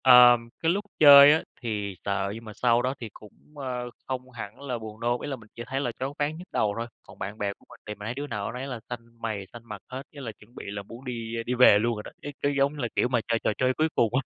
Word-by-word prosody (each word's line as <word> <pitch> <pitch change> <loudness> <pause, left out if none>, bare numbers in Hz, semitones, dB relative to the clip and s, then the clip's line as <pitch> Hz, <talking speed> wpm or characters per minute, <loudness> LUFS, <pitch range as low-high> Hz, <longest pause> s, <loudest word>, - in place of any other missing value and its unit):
Ờm, 125 -2 +8
cái 165 - +2
lúc 200 +3 -1
chơi 145 -1 +11
á 160 - +1 0.2
thì 105 -4 -3
sợ, 100 0 0
nhưng 115 +1 -9
mà 110 - -8
sau 120 +1 +3
đó 130 +2 0
thì 115 - -6
cũng, 105 - -14 0.2
ơ, 125 -3 -4 0.2
không 130 -1 -4
hẳn 110 -1 -8
là 130 -4 -3
buồn 110 -1 -9
nôn. 120 +1 0
Ý - - -4
là 140 - -2
mình 110 -4 -16
chỉ 120 - -6
thấy 135 +1 -2
là 125 -4 -1
choáng 135 +2 -2
váng, 150 +2 0
nhức 180 +2 -10
đầu 105 -1 +1
thôi. 115 +1 -3 0.2
Còn - - -16
bạn 100 +2 -5
bè 100 -1 -1
của - - -27
mình - - -14
thì 105 - -4
mình 105 - -9
thấy 115 - -2
đứa 145 +3 -5
nào 105 -4 -3
đứa 125 - -6
nấy 135 - -4
là 125 -4 -5
xanh 115 -1 -9
mày 105 -4 -3
xanh 120 - -9
mặt 105 -3 -8
hết, 130 +1 -5
với 145 - -9
là 115 - -4
chuẩn 110 +2 -20
bị - - -8
là 100 0 -4
muốn 115 +6 -12
đi 115 -2 -4
đi 125 - -1
về 125 -5 +7
luôn 120 +2 +1
rồi 105 - -6
đó, - - -8
cái 145 - -6
cái 145 0 +1
giống 140 +1 +3
như 150 - -9
là 120 - 0
kiểu - - +3
mà 125 -1 +1
chơi 115 -1 +1
trò - - +2
chơi 130 0 +2
cuối 155 - +3
cùng 115 - +4
á. 130 - +3
120 Hz, 305 wpm, -27 LUFS, 110-130 Hz, 0.2 s, chơi